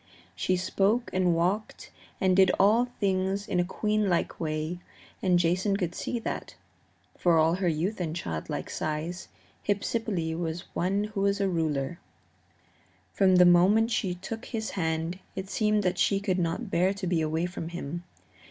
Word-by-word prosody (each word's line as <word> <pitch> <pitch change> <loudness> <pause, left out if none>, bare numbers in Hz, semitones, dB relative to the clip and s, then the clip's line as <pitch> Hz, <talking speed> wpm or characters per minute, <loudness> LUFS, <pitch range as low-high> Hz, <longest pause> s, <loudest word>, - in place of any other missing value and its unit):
She 185 - 0
spoke 200 +6 +1
and 180 -2 +2
walked 185 +6 -1 0.3
and 185 -1 +3
did 190 -1 +6
all 220 +5 +5
things 195 0 0
in 180 - 0
a - - +4
queenlike 205 -1 0
way, 155 +2 -2 0.4
and 180 -2 +3
Jason 180 +4 +1
could 180 -4 -2
see 240 - -3
that, 230 - -5 0.6
for 170 -2 +4
all 160 +1 +4
her 185 0 0
youth 175 +6 -1
and 160 -2 -2
childlike 80 - -4
size, 155 +4 -3 0.4
Hypsipyle 200 -5 -1
was 165 0 -3
one 195 +3 0
who 195 - -1
was 200 0 +2
a 200 - +2
ruler. 160 -3 -1 1.1
From 190 -2 +4
the 180 0 +7
moment 195 +6 +5
she 195 -6 0
took 220 +6 -7
his 220 -3 -4
hand 165 0 -2 0.2
it 190 0 -5
seemed 210 -1 +2
that 180 -1 0
she 200 - +3
could 190 -2 0
not 180 +6 -2
bear 185 +3 +2
to 195 - -5
be 175 -2 +1
away 160 +2 0
from 175 -2 -5
him. 170 0 -5
180 Hz, 160 wpm, -28 LUFS, 170-200 Hz, 1.1 s, the